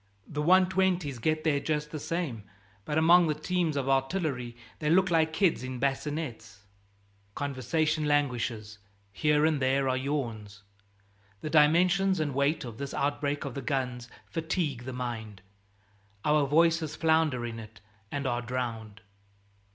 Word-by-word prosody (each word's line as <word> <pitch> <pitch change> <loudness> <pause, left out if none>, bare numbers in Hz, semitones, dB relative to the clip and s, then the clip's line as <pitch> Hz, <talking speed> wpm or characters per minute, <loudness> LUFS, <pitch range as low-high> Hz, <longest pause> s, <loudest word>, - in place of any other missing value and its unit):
The 150 - -4
120's 185 -4 +2
get 155 +5 0
there 150 -3 +2
just 150 0 -2
the 155 - -5
same, 145 - -3 0.4
but 150 - -2
among 170 +2 +6
the 150 - 0
teams 165 -1 -1
of 135 -1 -1
artillery 135 -3 -1 0.2
they 150 - -1
look 185 +3 +4
like 160 -1 +3
kids 175 +1 +2
in 130 -1 -5
bassinettes." 135 -6 -3 0.7
Conversation 150 +3 -1
languishes; 120 -7 -1 0.3
here 150 +7 +2
and 155 -3 +1
there 135 +1 +2
are 130 - +1
yawns. 115 -7 -4 0.8
The 155 - -4
dimensions 175 +5 +4
and 150 -3 -1
weight 140 +2 +1
of 115 -2 -9
this 140 0 -5
outbreak 145 0 -1
of 140 - -5
the 140 - -5
guns 125 -2 -3 0.2
fatigue 160 -6 -2
the 130 - -4
mind. 110 -5 -5 0.8
Our 150 -1 +3
voices 160 +1 +2
flounder 160 -7 +2
in 115 -1 -5
it 110 0 -12 0.3
and 140 -1 -3
are 120 -2 0
drowned. 115 -3 -5
145 Hz, 145 wpm, -29 LUFS, 125-160 Hz, 0.8 s, among